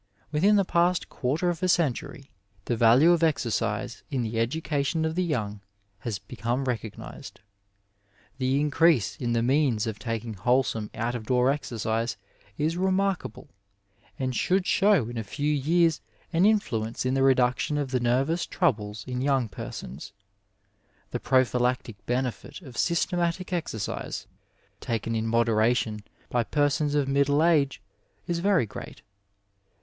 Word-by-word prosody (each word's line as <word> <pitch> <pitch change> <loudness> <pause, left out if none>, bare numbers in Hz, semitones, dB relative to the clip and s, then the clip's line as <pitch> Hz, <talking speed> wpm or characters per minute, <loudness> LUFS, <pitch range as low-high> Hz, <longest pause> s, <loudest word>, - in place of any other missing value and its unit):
Within 190 +8 +4
the 200 -2 +3
past 175 +1 +1
quarter 155 +7 0
of 165 - -6
a 185 - +1
century 140 -4 -1 0.3
the 120 - 0
value 120 +9 +6
of 170 -1 +3
exercise 115 -6 0
in 135 -5 -1
the 115 0 -2
education 150 +5 0
of 160 - -1
the 185 +2 0
young 105 - -2 0.4
has 110 -2 -3
become 120 +6 -3
recognized; 115 -4 -6 1.0
The 130 +1 +1
increase 145 - +3
in 120 -2 -1
the 115 0 +1
means 130 -4 +2
of 110 -2 -4
taking 115 0 -4
wholesome 115 +1 0
out 120 +2 -1
of 115 -3 -6
door 125 +1 +3
exercise 115 -4 -2 0.4
is 160 +3 0
remarkable, 190 -4 -1 0.7
and 130 -1 -2
should 185 +6 +1
show 195 - +3
in 120 -1 -5
a - - -3
few 145 +8 -1
years 165 +3 +2 0.3
an 175 +5 +4
influence 115 - 0
in 130 - +1
the 135 - +1
reduction 130 +2 +2
of 140 -3 -2
the 130 - +1
nervous 135 +8 +1
troubles 105 - -1
in 125 -1 -4
yomig 135 -5 +1
persons. 70 -3 -8 1.0
The - - -2
prophylactic 125 -3 +1
benefit 125 0 -2
of 130 -5 -11
systematic 175 +3 0
exercise, 115 - -3 0.5
taken 115 0 -2
in 110 0 -1
moderation 115 -1 +2 0.3
by 120 -1 +2
persons 145 +3 +1
of 145 -2 +2
middle 140 +2 +3
age, 150 -5 +2 0.4
is 170 -1 -1
very 190 - +3
great. - - -10
130 Hz, 140 wpm, -26 LUFS, 115-160 Hz, 1.0 s, value